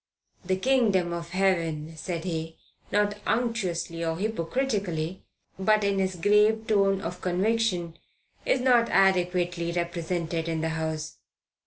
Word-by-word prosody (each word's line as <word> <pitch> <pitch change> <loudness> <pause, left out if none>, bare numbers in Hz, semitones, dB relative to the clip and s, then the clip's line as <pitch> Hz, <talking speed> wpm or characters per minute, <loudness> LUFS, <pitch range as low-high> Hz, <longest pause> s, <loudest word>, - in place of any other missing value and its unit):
"The 185 +1 0
Kingdom 195 -6 +2
of 170 0 -5
Heaven," 165 -4 0
said 165 +1 -4
he, 165 -2 -4 0.3
not 205 0 +1
unctuously 190 -8 -1
or 165 0 -1
hypocritically, 195 -4 -2 0.4
but 215 +2 +3
in 200 -1 +1
his 190 -1 0
grave 210 +5 +3
tone 195 -3 +2
of 180 0 -5
conviction, 185 -2 0 0.4
"is 255 - +1
not 245 -2 +4
adequately 180 -2 +2
represented 170 -1 -2
in 160 -1 -1
the 160 - 0
House." 160 -1 -4
180 Hz, 125 wpm, -27 LUFS, 165-210 Hz, 0.4 s, not